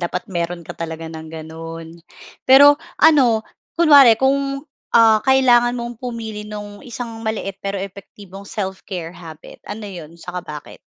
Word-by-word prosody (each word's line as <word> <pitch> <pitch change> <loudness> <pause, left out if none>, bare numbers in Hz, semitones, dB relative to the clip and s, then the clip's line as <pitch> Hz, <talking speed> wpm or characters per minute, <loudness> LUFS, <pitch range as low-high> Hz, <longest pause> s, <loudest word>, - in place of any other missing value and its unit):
Dapat 180 +2 -3
meron 170 -3 -4
ka - - -6
talaga 165 -1 -6
ng 160 0 -9
gano'n. 165 +1 -9 0.5
Pero 285 +2 +8 0.2
ano, 260 -8 +4 0.3
kunwari 285 -8 +7
kung, 275 +1 0 0.3
ah, 225 -2 +5
kailangan 250 -2 +4
mong 235 0 -6
pumili 225 -4 -6
nung 205 -1 -8
isang 235 -2 -7
maliit 210 -3 -4
pero 200 0 -3
epektibong 195 0 -10
self-care 190 -4 -5
habit, 160 -3 -12
ano 210 +1 -6
'yon, 170 -4 -10
saka 180 +1 -6
bakit? 150 -3 -10
205 Hz, 135 wpm, -19 LUFS, 170-240 Hz, 0.5 s, Pero